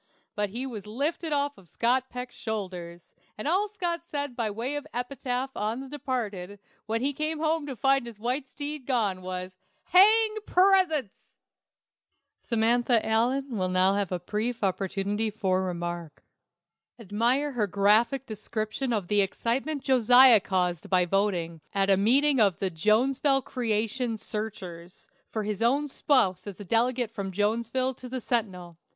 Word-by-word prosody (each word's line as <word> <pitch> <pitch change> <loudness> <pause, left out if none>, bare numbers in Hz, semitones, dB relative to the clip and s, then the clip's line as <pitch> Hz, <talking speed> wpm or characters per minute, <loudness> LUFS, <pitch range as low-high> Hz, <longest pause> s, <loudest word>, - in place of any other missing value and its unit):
But 205 -1 -1
he 240 +6 -4
was 215 -6 -7
lifted 295 +8 -2
off 285 0 0
Scott 250 +7 0
Peck's 250 0 -7
shoulders, 180 -6 -6 0.2
and 215 - -4
all 380 +6 +2
Scott 345 -5 -3
said 285 -5 -4
by 230 -3 -1
way 235 +7 -3
of 290 - -5
epitaph 250 +1 -3
on 215 +4 -2
the 270 - -7
departed, 220 -9 -4 0.3
when 225 +1 -1
he 280 +2 +1
came 310 +3 -2
home 315 -1 0
to 270 - -5
find 270 0 +2
his 225 -3 -10
white 255 +5 -2
steed 290 -1 -6
gone, 210 -8 0
was, 185 0 -6 0.3
"Hang 430 +4 +6
presents!" 360 - +2 1.0
"Samantha 235 0 +1
Allen" 245 +4 0
will 185 0 0
now 185 +1 +3
have 200 -2 -1
"a 180 - -1
brief 215 +6 -3
opportunity 200 +3 -1
for 190 -3 0
remark." 175 -4 -5 0.7
Admire 235 +7 0
her 225 -6 0
graphic 215 +7 +2
description 215 +3 -4
of 205 -6 -1
the 205 +1 +3
excitement 260 +9 -2
Josiah 250 -2 +7
caused 180 -3 -1
by 180 -2 +3
voting, 175 -4 -1
at 195 0 +2
a - - +6
meeting 265 +8 +4
of 200 -6 +3
the 190 -1 -2
"Jonesville 260 - +2
Creation 225 0 -1
Searchers," 190 -6 -7 0.2
for 220 - -3
his 210 0 -3
own 275 +6 +2
spouse 205 -10 +1
as 200 -1 -8
a 205 - -8
delegate 235 +2 +1
from 195 -2 -5
Jonesville 230 +6 0
to 250 0 -10
the 260 +1 -3
"Sentinel." 185 -9 -3
230 Hz, 150 wpm, -27 LUFS, 195-265 Hz, 1.0 s, Josiah